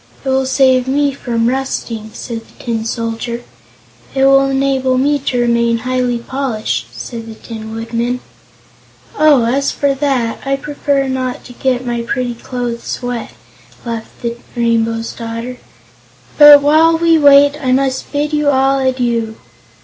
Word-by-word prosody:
"It - - -1
will 265 0 +1
save 260 -1 +3
me 285 +1 +1
from 235 -4 -2
rusting," 240 -4 -3
said 230 -2 -6
the - - -17
Tin 230 -2 -2
Soldier. 230 +1 -4 0.7
"It 270 0 +3
will 275 0 +5
enable 270 -1 +1
me 285 +2 +2
to 260 -2 -2
remain 235 -1 +2
highly 250 0 -1
polished," 245 -2 -3
said 230 -2 -8
the 225 - -9
Tin 220 -1 -8
Woodman. 235 +2 -2 1.0
"Oh, 290 -6 +4
as 275 +4 +1
for 280 -1 0
that, 265 -5 -1
I 275 - -1
myself 275 - -10
prefer 285 -2 -1
not 255 -1 -3
to 245 - -12
get 255 0 -1
my 240 -1 -2
pretty 245 +1 -2
clothes 240 0 -5
wet," 245 -2 -4 0.5
laughed 230 -1 -7
the 235 0 -3 0.2
Rainbow's 230 -1 0
daughter. 230 +2 -6 0.8
"But 295 -1 +9
while 320 +3 +4
we 330 -1 +3
wait 285 0 +6
I 260 -2 0
will 265 0 +2 0.2
bid 295 +1 -1
you 300 -1 +2
all 270 0 +2
adieu. 240 -4 -1
255 Hz, 150 wpm, -15 LUFS, 235-275 Hz, 1.0 s, But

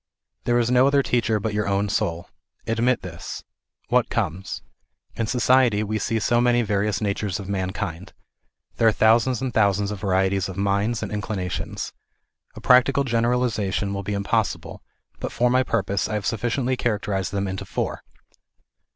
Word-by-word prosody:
There 120 0 +3
is 120 0 +1
no 125 +1 +5
other 140 0 +3
teacher 115 -4 +1
but 105 +1 -3
your 105 -1 -1
own 100 +1 +1
soul. 85 -5 -1 0.4
Admit 115 +1 +1
this. 90 -4 -7 0.5
What 125 -1 +2
comes? 95 -4 -3 0.5
In 115 - -2
society 125 -3 +3
we 110 +1 -2
see 115 +2 -1
so 120 +2 +2
many 120 0 +3
various 105 0 0
natures 100 -2 -1
of 100 - -7
man 95 -2 -1
kind. 95 -1 -5 0.7
There 115 - +4
are - - +6
thousands 115 +3 +3
and 130 -2 -2
thousands 100 -2 +2
of 105 - -5
varieties 95 0 +1
of 95 - -7
minds 100 +3 0
and - - -5
inclinations. 100 -3 -4 0.6
A - - -8
practical 130 +2 +5
generalization 115 -5 0
will 100 - -3
be 100 +1 -3
impossible, 100 +1 -1 0.4
but - - -4
for 120 0 +2
my 130 +1 +4
purpose 100 -5 -1
I 110 - -2
have 105 -1 -3
sufficiently 120 +3 0
character 105 -4 -1
ized 95 0 -1
them 100 0 -1
into 95 0 -4
four. - - -3
105 Hz, 170 wpm, -23 LUFS, 100-120 Hz, 0.7 s, are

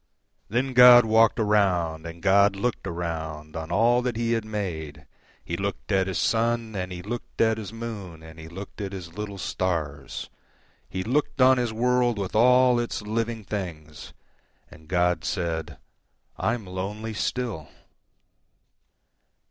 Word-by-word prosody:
Then 130 +5 0
God 125 -1 +9
walked 110 +1 +4
around, 90 -7 +1
And 85 0 -10
God 100 +1 +5
looked 115 +3 -2
aroundOn 80 -2 -5
all 120 +3 +3
that 125 -2 -2
He 115 0 -1
had 115 -2 +1
made. 80 -9 -5 0.4
He 85 - -3
looked 100 +3 -4
at 95 -1 +2
His 95 -3 -2
sun, 115 -1 0
And 90 -1 -3
He 90 -1 -6
looked 120 +4 -7
at 110 0 +3
His 105 -4 -7
moon, 105 -8 -7
And 80 0 -12
He 80 - -9
looked 95 +5 -9
at 100 -1 -4
His 85 -4 -8
little 105 0 -6
stars; 80 -7 -3 0.6
He 95 0 -3
looked 135 +5 -1
on 130 0 +6
His 120 -2 -1
worldWith 120 -3 +1
all 125 +2 +5
its 120 -2 -3
living 115 +1 -2
things, 85 -7 -6 0.6
And 80 0 -15
God 90 -1 +1
said, 80 -5 -3 0.6
"I'm 115 -2 -1
lonely 100 +4 -5
still." 110 -7 -3
100 Hz, 140 wpm, -25 LUFS, 85-115 Hz, 0.6 s, God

